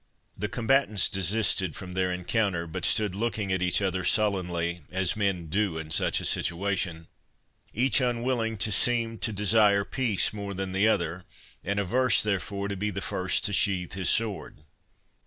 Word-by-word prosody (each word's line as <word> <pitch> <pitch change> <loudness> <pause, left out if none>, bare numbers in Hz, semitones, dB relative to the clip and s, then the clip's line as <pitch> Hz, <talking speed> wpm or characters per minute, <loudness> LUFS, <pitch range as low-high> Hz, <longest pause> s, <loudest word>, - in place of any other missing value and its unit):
'" - - -45
The 105 - -4
combatants 115 -4 +2
desisted 95 -2 0
from 90 -1 -8
their 95 0 0
encounter, 90 -1 -1
but 80 - -4
stood 105 -4 +2
looking 105 -1 -2
at 95 -1 0
each 90 +2 +1
other 95 -1 -1
sullenly, 90 -5 0
as 95 0 0
men 100 -5 -1
do 95 +1 -1
in 80 -1 -7
such - - +1
a - - -5
situation, 90 -2 -1 0.7
each 130 +4 +2
unwilling 120 -2 -1
to 110 - -3
seem 115 +2 0
to 115 - -1
desire 105 -1 +3
peace 115 -5 0
more 100 -2 -6
than 95 0 -4
the 95 +3 +2
other, 90 -4 0 0.4
and 100 +2 -2
averse 125 +5 +2
therefore 100 -1 -2
to 100 - -4
be 105 +2 -2
the 100 - -4
first 90 0 0
to 105 - -1
sheathe 90 -2 +1
his 95 -2 0
sword. 110 -3 -1
100 Hz, 170 wpm, -27 LUFS, 90-110 Hz, 0.7 s, desire